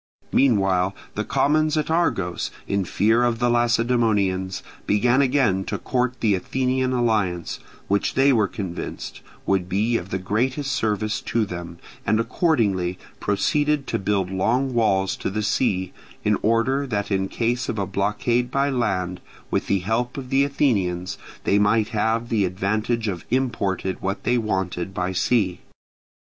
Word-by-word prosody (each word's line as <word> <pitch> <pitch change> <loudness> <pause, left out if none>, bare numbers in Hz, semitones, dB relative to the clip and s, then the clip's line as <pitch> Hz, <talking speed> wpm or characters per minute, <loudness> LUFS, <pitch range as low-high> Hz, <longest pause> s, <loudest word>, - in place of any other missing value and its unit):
Meanwhile 95 -7 +3 0.2
the - - -2
commons 155 +2 +2
at 155 +1 0
Argos, 100 - 0 0.2
in 100 -1 0
fear 110 +6 +2
of 120 -1 +2
the 120 +1 +2
Lacedaemonians, 115 -6 +1 0.2
began 120 +6 +3
again 125 -8 +2
to - - -2
court 125 0 -1
the 110 -3 +3
Athenian 130 +6 0
alliance, 105 -8 0 0.3
which 100 +1 0
they 135 +1 +5
were 110 -4 +3
convinced 95 -5 -6 0.2
would 95 -2 0
be 110 +5 +1
of 90 -1 -7
the 95 - -1
greatest 125 +9 -1
service 110 0 -1
to 115 -2 0
them; 85 -3 -7 0.3
and 110 +2 +2
accordingly 105 - +1 0.2
proceeded 145 +7 +1
to - - -2
build 95 -2 0
long 125 +8 +1
walls 95 -5 +2
to - - -2
the 105 +2 -2
sea, 95 -4 0 0.3
in 105 0 +3
order 120 +5 +1
that 105 -3 -2
in 95 -1 +1
case 120 +2 -1
of 110 - -2
a 100 - 0
blockade 105 +6 0
by 140 +2 +1
land; 95 -8 -1 0.3
with - - 0
the 100 -2 +1
help 115 +7 -1
of 130 -1 -7
the 135 +1 +4
Athenians 100 -11 0 0.2
they 100 - +3
might 105 +1 +3
have 115 +1 0
the 110 -4 +2
advantage 110 +5 -1
of 90 -4 -3
importing 105 -7 -1
what 100 +1 -3
they 125 0 +2
wanted 95 -3 -2
by 90 +1 -1
sea. 95 -1 +1
110 Hz, 155 wpm, -23 LUFS, 95-125 Hz, 0.3 s, they